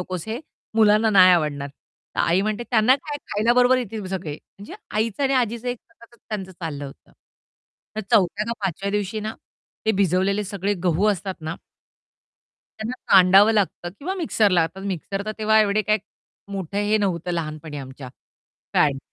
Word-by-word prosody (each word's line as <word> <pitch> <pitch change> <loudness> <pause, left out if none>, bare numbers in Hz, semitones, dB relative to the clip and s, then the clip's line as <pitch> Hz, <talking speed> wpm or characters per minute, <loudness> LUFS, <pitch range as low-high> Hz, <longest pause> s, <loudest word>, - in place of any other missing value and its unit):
नकोस 180 0 -5
हे 230 +5 -3 0.3
मुलांना 215 0 +4
नाही 185 -3 +7
आवडणार." 150 -4 0 0.5
तर - - 0
आई 175 +3 +3
म्हणते, 215 +2 -2
"त्यांना 240 +3 +5
काय 295 -1 -4 0.2
खायला 215 +3 +3
बरोबर 250 +1 +4
येतील 220 -4 -5
सगळे." 160 -5 -6 0.2
म्हणजे 200 - -10 0.2
आईचं 220 +4 -1
आणि 270 0 +2
आजीचं 235 +2 -6
एक 245 -1 -3
सततच 235 -4 -20
त्यांचं 195 -3 -5
चाललं 160 -5 -6
होतं. 135 - -15 0.8
तर - - 0
चौथ्या 200 +2 +3
का 235 - -1
पाचव्या 195 +2 -2
दिवशी 205 +1 -2
ना 215 +1 -4 0.5
ते 220 - +4
भिजवलेले 195 +2 +1
सगळे 200 0 -2
गहू 180 +4 +2
असतात 195 -1 -3
ना 155 +1 -4 1.2
त्यांना 220 +3 -4 0.2
कांडावं 195 +3 +7
लागतं 200 -4 0
किंवा 365 +7 -3
मिक्सरला. 210 - +2
आता 185 +4 -4
मिक्सर 195 0 -4
तर 215 - -2
तेव्हा 220 0 +4
एवढे 210 0 +2
काही 215 +2 +2 0.5
मोठं 195 0 -5
हे 210 +1 +2
नव्हतं 180 -4 -1
लहानपणी 155 -2 -5
आमच्या 130 -1 -9 0.7
फॅड 140 -3 +3
200 Hz, 165 wpm, -23 LUFS, 180-220 Hz, 1.2 s, नाही